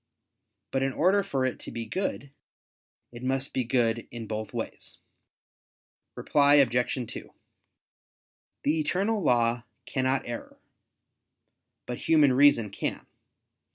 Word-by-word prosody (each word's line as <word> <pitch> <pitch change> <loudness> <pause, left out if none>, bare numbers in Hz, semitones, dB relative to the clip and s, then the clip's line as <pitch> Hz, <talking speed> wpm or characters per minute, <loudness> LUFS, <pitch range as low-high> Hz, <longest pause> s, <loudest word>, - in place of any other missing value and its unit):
But 135 - 0
in 135 0 0
order 185 +8 +3
for 140 -9 -1
it 130 - -2
to - - -8
be 115 -1 -5
good, 140 - -3 0.8
it 120 0 -10
must 135 +1 -1
be 130 - 0
good 115 -1 0
in 115 -1 -7
both 110 0 -5
ways. - - -6 1.2
Reply 145 0 +4
Obj. 125 -2 +2
2: - - -9 1.3
The 155 +3 +1
eternal 195 +8 0
law 120 -5 +2 0.2
cannot 130 0 -1
err, 120 -1 -7 1.3
but 125 - -5
human 150 -5 +4
reason 125 -6 +4
can. - - -4
130 Hz, 120 wpm, -27 LUFS, 120-145 Hz, 1.3 s, Reply